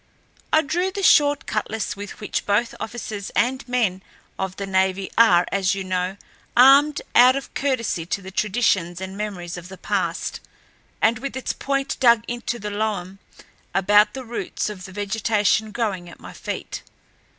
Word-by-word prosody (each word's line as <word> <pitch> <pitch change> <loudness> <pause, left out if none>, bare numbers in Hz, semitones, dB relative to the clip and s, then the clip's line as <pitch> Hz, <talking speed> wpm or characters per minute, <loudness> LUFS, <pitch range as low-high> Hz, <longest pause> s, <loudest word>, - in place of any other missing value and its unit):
I 315 0 +4
drew 355 +6 0
the 390 +1 -5
short 290 -4 +5
cutlass 215 -2 -2
with 205 0 -8
which 210 - -3
both 210 +4 +1
officers 220 -3 -5
and 255 +4 +1
men 225 -7 0 0.4
of 190 -1 -3
the 200 - -4
navy 190 0 0
are, 180 -7 +6
as 195 -1 +1
you 195 - -4
know, 185 +1 -2 0.4
armed 280 +4 +6
out 250 +2 +7
of 275 - -6
courtesy 230 -11 -1
to 200 - -1
the 190 - -8
traditions 190 -4 +1
and 190 0 -6
memories 185 -4 -5
of 175 +1 -9
the 190 - -10
past, - - -2 0.6
and 225 +1 +3
with 270 0 -5
its 260 - -3
point 275 0 -2
dug 235 -3 +5
into 240 0 -3
the 210 -2 -5
loam 200 -3 -3 0.6
about 205 +3 +4
the 260 -1 -6
roots 230 -2 -3
of 185 -3 -9
the 190 - -10
vegetation 210 +1 0
growing 205 -6 -2
at - - -14
my - - -11
feet. - - -6
210 Hz, 165 wpm, -23 LUFS, 190-245 Hz, 0.6 s, out